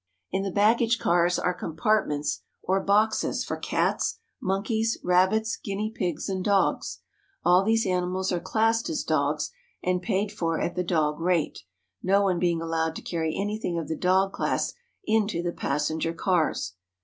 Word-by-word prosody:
In 190 - 0
the 195 - -2
baggage 225 +4 +3
cars 175 -2 +2
are 180 - 0
compartments 165 -3 0 0.2
or 190 +1 +2
boxes 215 +2 +2
for - - -3
cats, - - 0 0.2
monkeys, 220 +4 0
rabbits, 190 +5 +2
guinea 210 +2 -2
pigs, 180 -8 -2
and 190 -2 -2
dogs. 150 - +1 0.4
All 180 +2 +6
these 225 +2 +2
ani 180 -1 +1
mals 185 +1 -1
are 175 - 0
classed 225 - +1
as 320 - -1
dogs - - 0 0.3
and 180 0 +1
paid 200 0 0
for 165 -5 -1
at 175 - -1
the 180 - -1
dog 155 -3 0
rate, 170 -2 0 0.4
no 200 +2 +3
one 185 -3 +1
being 170 -2 +1
allowed 160 0 -1
to - - -7
carry 160 -2 -2
anything 205 -3 -2
of 165 -3 -3
the 160 - -2
dog 190 +3 +2
class - - -1 0.3
into 215 -5 +1
the 175 -1 -2
passenger 155 +3 -1
cars. 170 - 0
185 Hz, 160 wpm, -26 LUFS, 170-210 Hz, 0.4 s, All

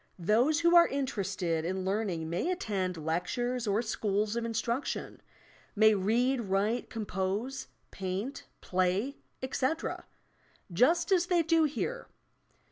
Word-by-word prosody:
Those 235 - +2
who 340 +1 +4
are 340 0 +8
interested 195 - -2
in 185 +2 -2
learning 190 -5 -1
may 175 - -1
attend 195 - -2
lectures 230 +10 -2
or 205 +3 +1
schools 215 -1 -1
of 235 - -1
instruction, 230 +3 -3 0.5
may 215 +1 +6
read, 235 +6 +1
write, 205 +3 0
compose, 210 +4 -3 0.2
paint, 195 +8 -4
play, 185 +9 0 0.3
etc., 260 +4 -2 0.7
just 315 - +3
as 360 -2 +3
they 350 -2 +3
do 325 0 +3
here. 480 - -3
220 Hz, 120 wpm, -30 LUFS, 190-270 Hz, 0.7 s, are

